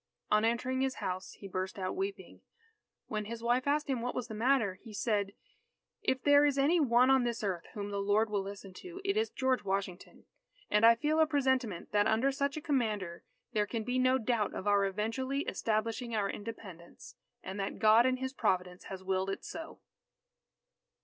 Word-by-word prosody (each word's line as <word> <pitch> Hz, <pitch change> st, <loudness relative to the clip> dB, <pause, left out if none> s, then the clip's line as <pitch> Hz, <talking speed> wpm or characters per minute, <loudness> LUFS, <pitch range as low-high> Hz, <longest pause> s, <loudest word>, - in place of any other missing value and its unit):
On 215 Hz, 0 st, +4 dB
entering 250 Hz, +3 st, 0 dB
his 265 Hz, -1 st, 0 dB
house, 185 Hz, +1 st, -4 dB
he 200 Hz, -, -10 dB
burst 185 Hz, +1 st, -4 dB
out 185 Hz, -1 st, -3 dB
weeping. 390 Hz, +1 st, -5 dB, 0.6 s
When 215 Hz, -1 st, -3 dB
his 230 Hz, +2 st, -7 dB
wife 245 Hz, +3 st, +1 dB
asked 300 Hz, +2 st, +1 dB
him 260 Hz, -4 st, -1 dB
what 245 Hz, +1 st, -3 dB
was 250 Hz, -2 st, -3 dB
the -, -, -5 dB
matter, 220 Hz, -4 st, +1 dB
he 225 Hz, -2 st, -11 dB
said: 205 Hz, -3 st, 0 dB, 0.7 s
"If 260 Hz, 0 st, 0 dB
there 285 Hz, 0 st, +6 dB
is 290 Hz, -2 st, +2 dB
any 300 Hz, +6 st, +4 dB
one 250 Hz, -2 st, +4 dB
on 265 Hz, -2 st, +5 dB
this 235 Hz, -2 st, -2 dB
earth 185 Hz, -4 st, -2 dB
whom 205 Hz, -1 st, -4 dB
the 200 Hz, 0 st, -2 dB
Lord 205 Hz, +2 st, +2 dB
will 210 Hz, -2 st, -1 dB
listen 195 Hz, -1 st, -8 dB
to, 365 Hz, 0 st, -9 dB
it 395 Hz, 0 st, +1 dB
is 440 Hz, +1 st, +1 dB
George 260 Hz, -1 st, 0 dB
Washington. 195 Hz, -2 st, -4 dB, 0.5 s
And 210 Hz, +2 st, +6 dB
I 230 Hz, -, +8 dB
feel 300 Hz, +6 st, 0 dB
a 315 Hz, -, +5 dB
presentiment 260 Hz, -, 0 dB
that 205 Hz, +1 st, +3 dB
under 225 Hz, +5 st, +2 dB
such 280 Hz, +2 st, -1 dB
a -, -, -4 dB
Commander 215 Hz, -, -1 dB, 0.3 s
there 210 Hz, -2 st, +1 dB
can 225 Hz, 0 st, -3 dB
be 250 Hz, +3 st, -1 dB
no 255 Hz, +1 st, +4 dB
doubt 225 Hz, -3 st, -1 dB
of -, -, -5 dB
our 205 Hz, -1 st, +3 dB
eventually 230 Hz, +8 st, -2 dB
establishing 230 Hz, 0 st, -2 dB
our 205 Hz, -2 st, +1 dB
Independence, 200 Hz, -6 st, -9 dB, 0.3 s
and 190 Hz, +2 st, -6 dB
that 195 Hz, -, -3 dB
God 220 Hz, +3 st, +6 dB
in 255 Hz, 0 st, +1 dB
His 260 Hz, +1 st, -4 dB
providence 180 Hz, -6 st, -1 dB
has 190 Hz, -1 st, -7 dB
willed 190 Hz, 0 st, 0 dB
it 195 Hz, -, -4 dB
so." 325 Hz, 0 st, -8 dB
225 Hz, 195 wpm, -32 LUFS, 200-260 Hz, 0.7 s, I